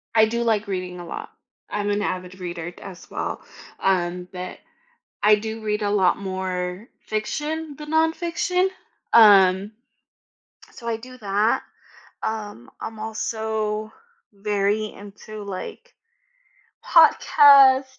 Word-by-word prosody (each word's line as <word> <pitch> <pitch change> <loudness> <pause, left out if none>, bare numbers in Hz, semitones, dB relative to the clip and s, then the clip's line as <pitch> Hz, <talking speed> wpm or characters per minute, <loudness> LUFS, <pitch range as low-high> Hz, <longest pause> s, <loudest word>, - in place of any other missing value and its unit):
I 220 -1 +7
do 235 +2 -1
like 220 -3 +1
reading 180 -2 -4
a 175 - -8
lot. - - -7 0.4
I'm 205 0 -2
an 205 0 0
avid 185 -1 -4
reader 175 -1 -5
d - - -17
as 185 -3 -11
well, - - -4 0.4
um, 180 -1 0
but 180 0 -7 0.7
I 210 0 +7
do 220 +1 -5
read 210 0 -2
a 205 - 0
lot 195 -3 +3
more 185 +1 -4 0.2
fiction 295 +8 -3
than 300 0 -8
nonfiction, 340 +3 +1 0.5
um, 200 -3 +6 1.0
so 235 - -11
I 225 -1 -1
do 255 +2 -12
that. 205 +1 +1 0.6
Um, 210 - -5
I'm 220 -1 -6
also 220 0 -3 0.4
very 205 +1 0
into, 205 +1 -10
like, 200 - -8 0.9
podcasts 270 -2 +6
210 Hz, 120 wpm, -23 LUFS, 190-230 Hz, 1.0 s, I